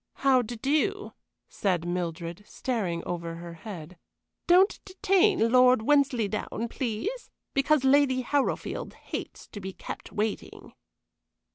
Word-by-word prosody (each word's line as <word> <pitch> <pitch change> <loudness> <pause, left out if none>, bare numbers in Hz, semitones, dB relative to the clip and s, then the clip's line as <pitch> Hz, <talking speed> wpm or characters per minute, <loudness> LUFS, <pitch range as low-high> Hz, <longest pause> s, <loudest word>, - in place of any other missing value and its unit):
"How 260 -2 +6
d' 235 0 -7
do," 350 - 0 0.3
said 180 -4 -1
Mildred, 170 +1 -4
staring 195 -10 -2
over 170 -1 -4
her 170 0 -8
head. 170 -2 -9 0.5
"Don't 370 +3 +5
detain 380 - +2
Lord 250 -2 +5
Wensleydown, 235 -5 +1
please, 270 - -3 0.2
because 275 +1 +3
Lady 265 -1 +4
Harrowfield 280 +3 -1
hates - - -7
to 205 - -8
be 190 0 -6
kept - - -8
waiting." 215 0 -4
235 Hz, 115 wpm, -27 LUFS, 185-285 Hz, 0.5 s, How